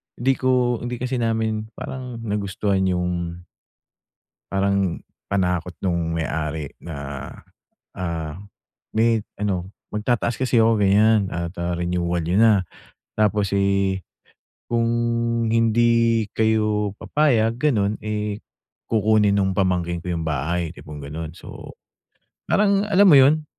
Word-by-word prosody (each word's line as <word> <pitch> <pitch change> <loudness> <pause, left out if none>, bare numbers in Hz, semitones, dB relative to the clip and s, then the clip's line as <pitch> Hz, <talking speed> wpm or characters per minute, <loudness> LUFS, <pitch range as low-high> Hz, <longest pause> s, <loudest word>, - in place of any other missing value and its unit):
hindi 130 +3 +2
ko 125 -2 +2
hindi 120 0 -4
kasi 125 0 -1
namin 110 -1 -1
parang 125 -3 -7
nagustuhan 100 -2 -1
yung 90 -1 -2 1.1
parang 100 -2 +1 0.3
panakot 90 -2 0
nung 85 -3 -1
may-ari 80 -2 -3
na, 70 -4 -6 0.7
ah, 85 -4 -4 0.6
may 110 -1 +2 0.2
ano, 95 -2 -2 0.2
"Magtataas 115 +2 -1
kasi 125 -3 +2
ako 110 0 +4
ganyan 105 +1 +4
at, 85 0 -3
ah, 85 0 -2
renewal 85 0 -1
yun, 90 +7 +3
ha. 105 -4 +5 0.5
Tapos, 105 -2 +1
eh, 100 -1 +1 0.7
kung 115 -1 +1 0.6
hindi 115 0 +3
kayo 105 -2 +1
papayag, 120 -7 +2
gano'n, 110 -7 +1
eh, 105 -1 -2 0.5
kukunin 110 -2 +3
nung 95 -1 +1
pamangkin 90 -3 +1
ko 90 - -2
yung 80 -1 -3
bahay," 80 +3 -1
tipong 75 -3 -10
ganun. 80 +3 -6
So, 85 - -11 0.8
parang 200 0 +2
alam 200 -1 +5
mo 155 - +8
yun? 150 +4 +4
100 Hz, 115 wpm, -22 LUFS, 90-115 Hz, 1.1 s, mo